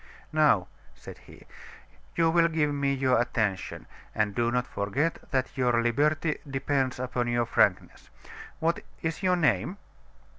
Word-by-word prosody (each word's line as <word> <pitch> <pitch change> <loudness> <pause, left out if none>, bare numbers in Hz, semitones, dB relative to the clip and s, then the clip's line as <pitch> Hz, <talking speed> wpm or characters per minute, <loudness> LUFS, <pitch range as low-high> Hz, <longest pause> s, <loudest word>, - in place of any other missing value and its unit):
"Now," 150 -13 +3 0.3
said - - -11
he, - - -16 0.7
"you 165 -1 +3
will 170 0 +4
give 155 -3 0
me 140 -1 0
your 130 -3 +2
attention; 110 -5 -2 0.3
and 105 -2 0
do 120 +2 +1
not 125 +1 0
forget 130 +13 -1
that 130 -1 -1
your 125 -3 +2
liberty 150 +7 +1
depends 135 -1 -1
upon 125 -1 -2
your 120 0 +1
frankness. - - 0 0.5
What 165 +1 0 0.2
is 160 +3 -2
your 185 -1 +3
name?" 175 +3 +1
135 Hz, 140 wpm, -27 LUFS, 120-155 Hz, 0.7 s, will